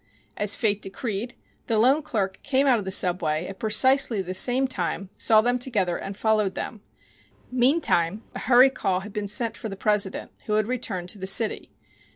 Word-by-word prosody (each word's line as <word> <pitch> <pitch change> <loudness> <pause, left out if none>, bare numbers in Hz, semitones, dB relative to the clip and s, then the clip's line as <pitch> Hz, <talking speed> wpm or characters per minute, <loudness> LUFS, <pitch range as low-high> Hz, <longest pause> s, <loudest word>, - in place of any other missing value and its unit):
As 205 -1 +1
Fate 210 -3 0
decreed, 215 +3 -5 0.3
the 225 - +1
loan 260 +7 +4
clerk 200 -10 -3
came 275 0 +1
out 255 -4 +3
of 200 - -7
the - - -3
subway 175 -4 0
at 195 +1 -9
precisely 235 +2 +3
the 185 -1 -4
same 250 +7 +2
time, 195 -3 -1
saw 220 -1 +4
them 245 +2 0
together 205 -9 0
and 195 +2 -7
followed 215 -3 +1
them. 215 - -6 0.7
Meantime 240 - +1
a - - -6
hurry 255 +1 +5
call 185 -7 -1
had 205 +1 -10
been 210 -2 -3
sent 225 +2 -1
for 220 - -6
the 195 - -6
president, 210 -2 0 0.2
who 210 - -1
had 215 0 +2
returned 190 -7 -4
to 205 - -6
the 190 - -5
city. 215 +3 +1
215 Hz, 190 wpm, -24 LUFS, 195-245 Hz, 0.7 s, hurry